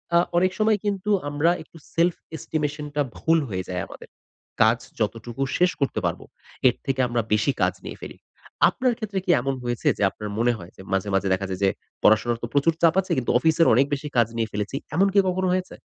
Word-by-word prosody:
আ - - +7 0.2
অনেক 185 +1 +3
সময় 215 0 +3
কিন্তু 205 0 -2 0.2
আমরা 145 +4 +2
একটু - - -18 0.2
self 170 +1 +3 0.2
estimation 150 -1 -3
টা 150 - +2 0.2
ভুল 165 0 +3
হয়ে 95 -2 -3
যায় 90 -1 -2
আমাদের। - - -12 0.5
কাজ 110 +2 +5 0.2
যতটুকু 115 +3 -3 0.2
শেষ 180 0 +3
করতে 140 - 0
পারব - - -1 0.5
এর 125 - +3
থেকে 135 -1 -1
আমরা 120 -1 0
বেশি 110 +6 +2
কাজ - - +3
নিয়ে - - -7
ফেলি। - - -9 0.5
আপনার 255 -2 0
ক্ষেত্রে 210 -4 -3
কি 180 - +3
এমন 135 +1 -1
হয়েছে 120 -1 -2
যে, - - -6
আপনার 105 -1 -7
মনে 120 +1 +3
হয় 85 -3 -11
যে, - - -10
মাঝে, 95 +1 0
মাঝে 95 0 +1
দেখা 95 +1 -1
যায় 95 -1 -4
যে, 100 - +5 0.3
পড়াশোনার 115 +2 +4
তো - - -1
প্রচুর 145 +3 +3
চাপ 170 0 +5
আছে 185 - -9
কিন্তু 125 - 0
অফিসের 160 +5 +3
অনেক 130 +5 +5
বেশি 145 +1 -3
কাজ 115 -2 +5
নিয়ে 115 -2 -1
ফেলেছি, 105 +4 -3 0.2
এমন 195 +4 +4
কি 200 - +5
কখনো 185 +1 0
হয়েছে? 185 0 -2
135 Hz, 210 wpm, -24 LUFS, 110-175 Hz, 0.5 s, আ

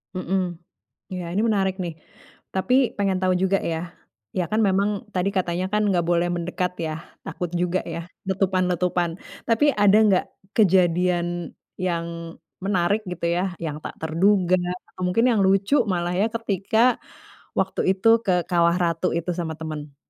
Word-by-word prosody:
Mhm. 185 -1 -1 0.6
Iya 180 -1 -4
ini 195 - +1
menarik 195 -3 +1
nih, 175 -2 -3 0.6
tapi 190 +7 +1 0.2
pengen 195 -2 +1
tahu 185 0 +3
juga 195 +1 +3
ya. 160 - -1 0.6
Iya 180 - 0
kan 215 - +2
memang 195 +2 +2 0.2
tadi 185 +1 +1
katanya 180 0 0
kan 210 0 +2
enggak 175 -3 +1
boleh 175 0 +2
mendekat 180 +1 -2
ya, 155 - -2 0.3
takut 180 -3 -4
juga 180 +1 +1
ya, 165 - -3 0.3
letupan-letupan. 180 -2 +1 0.4
Tapi 230 +4 +3
ada 205 0 +5
enggak 195 -4 +3 0.3
kejadian 180 -3 +3 0.5
yang 170 -2 -1 0.6
menarik 195 +1 +1
gitu 175 -1 -3
ya, 180 - +1 0.2
yang 150 -2 -3
tak - - -6
terduga 180 +3 +3 0.4
atau - - -8
mungkin 230 +7 +2
yang 220 - +2
lucu 195 +7 +2 0.2
malah 175 0 -1
ya, 210 - +3
ketika 220 -2 -1 0.8
waktu - - 0
itu, 190 +4 0 0.2
ke 190 - +2 0.2
Kawah 170 -1 +3
Ratu 170 +1 +1
itu 170 +2 -2
sama 165 -2 -2
temen? 150 -3 -6
180 Hz, 150 wpm, -24 LUFS, 175-195 Hz, 0.8 s, ada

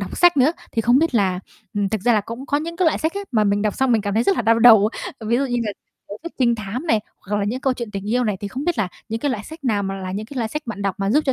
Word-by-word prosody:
đọc 195 - -5
sách 350 -2 +5
nữa 275 +3 +4 0.2
thì 225 - 0
không 245 +3 +4
biết 325 -4 +1
là, 190 -4 +2 0.3
ừm, 205 -1 0
thực 215 +1 -2
ra 240 +4 +3
là 215 - +3
cũng 230 +7 -8
có 285 - +1
những 335 +3 -5
cái 365 0 +2
loại 320 - +2
sách 320 +1 0
á 400 - -2
mà 215 -3 +3
mình 205 0 +1
đọc 210 -2 0
xong 265 -2 +2
mình 225 - +3
cảm 205 0 -2
thấy 225 - +3
rất 380 +9 +2
là - - 0
đau 230 +1 +4
đầu, 220 -3 +7 0.4
ví 235 +2 +2
dụ 275 - +1
như 245 -1 -1
là 210 - -2 0.4
tiểu 205 - -6
thuyết 335 - -7
trinh 240 -3 +3
thám 225 +7 -5
này, 225 -8 +3 0.2
hoặc 205 +2 -3
là 200 - 0
những 240 +6 -2
câu 265 - +1
chuyện 235 -3 -6
tình 200 +1 -5
yêu 245 +1 +2
này. 210 -3 0
Thì 205 - -4
không 260 +7 -5
biết 345 -5 0
là 195 -4 +1 0.2
những 225 +1 -3
cái 290 - 0
loại 215 -4 -3
sách 320 -2 -11
nào 215 -5 +1
mà 195 0 -3
là 185 -1 -5
những 210 +3 -4
cái 275 - -10
loại 230 -3 -1
sách 300 +7 -4
bạn 210 -3 -5
đọc 195 -1 0
mà 195 +1 0
giúp 300 +5 +3
cho 265 - +3
230 Hz, 350 wpm, -21 LUFS, 205-265 Hz, 0.4 s, đầu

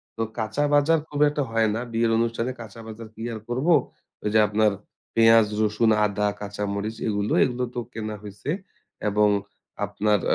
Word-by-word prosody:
তো 115 - -4 0.2
কাঁচা 110 +6 -1
বাজার 150 +3 +4
খুব 145 -1 -5
একটা 145 0 -1
হয় 115 -1 +3
না। - - -1
বিয়ের 115 0 +1
অনুষ্ঠানে 115 +2 0
কাঁচা 115 0 -10
বাজার 110 +1 -8
কি 110 - -10
আর 110 - -5
করবো? 135 +8 +2 0.5
ওই 105 - 0
যে 110 - +6
আপনার 105 0 +3 0.4
পেঁয়াজ, 115 -1 +7 0.2
রসুন, 110 +1 +2 0.2
আদা, 105 0 0
কাঁচা 105 0 -4
মরিচ 105 +2 -3
এগুলো, 105 -1 0
এগুলো 125 0 -1
তো - - -1
কেনা 110 -1 -4
হইছে 105 +7 -8 0.6
এবং 105 +1 +3 0.6
আপনার 105 +1 +1
110 Hz, 170 wpm, -25 LUFS, 105-115 Hz, 0.6 s, পেঁয়াজ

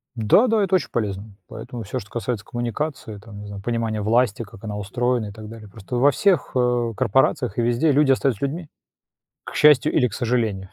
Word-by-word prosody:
Да 115 - +4
да, 220 -2 +2
это 190 -1 +2
очень 185 - 0
полезно, 100 -2 -4
поэтому 115 +1 -8
всё, 100 - -4
что 100 - -12
касается 115 -2 -4
коммуникации, 120 -1 -4
там, 105 0 -12
не 105 - -9
знаю, 100 -1 -8
понимания 115 -1 -2
власти, 115 +1 +1
как 100 0 -15
она 105 -1 -5
устроена 120 +3 -1
и - - -8
так 110 +1 -10
далее, 110 -1 -11
просто 110 +4 -8
во 140 +3 +5
всех, 195 +6 +1
э, 120 -2 +1
корпорациях 130 -4 +1
и - - +2
везде 120 +6 +2
люди 140 -1 +4
остаются 130 -3 0
людьми, 160 +3 -5 0.8
к - - -9
счастью 150 0 +5
или 125 -4 +3
к 105 - -10
сожалению. 110 -6 -1
120 Hz, 200 wpm, -22 LUFS, 105-130 Hz, 0.8 s, во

